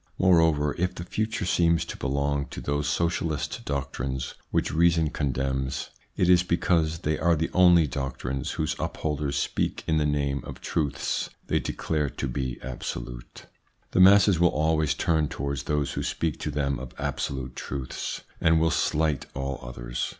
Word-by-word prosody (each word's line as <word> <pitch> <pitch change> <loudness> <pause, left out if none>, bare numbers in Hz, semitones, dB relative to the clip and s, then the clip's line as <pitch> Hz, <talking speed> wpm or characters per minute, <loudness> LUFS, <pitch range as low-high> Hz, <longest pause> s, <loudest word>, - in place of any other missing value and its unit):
Moreover, 80 -5 +4
if 90 +1 0
the 85 - -5
future 110 +2 -2
seems 85 -1 +3
to - - -6
belong 70 +1 -1
to - - -7
those 75 +1 -1
socialist 85 -2 -1
doctrines 65 -2 -3 0.2
which - - 0
reason 85 -1 +3
condemns, 65 -1 -2 0.3
it 90 - +3
is 90 -1 +6
because 85 -2 +1
they 75 -1 0
are 85 0 +3
the 80 +1 -1
only 90 -3 +6
doctrines 65 -1 -3
whose - - -1
upholders 75 -2 -2
speak - - -1
in 80 - +1
the 75 - +1
name 70 -1 0
of - - -8
truths 75 -4 -1 0.2
they - - +1
declare 75 -3 -1
to - - -4
be 65 0 -3
absolute. - - -6 0.5
The - - +1
masses 100 -1 +7
will 85 0 +5
always 80 -1 +1
turn 80 -2 +1
towards 70 -1 -4
those 75 -2 0
who - - -3
speak 80 -3 -2
to - - -3
them 70 -2 -1
of 65 0 -9
absolute 65 -2 -3
truths, 65 -2 -4 0.2
and 80 0 +4
will 80 0 +3
slight 75 -3 +1
all 70 0 -3
others. - - -4
75 Hz, 160 wpm, -26 LUFS, 70-80 Hz, 0.5 s, masses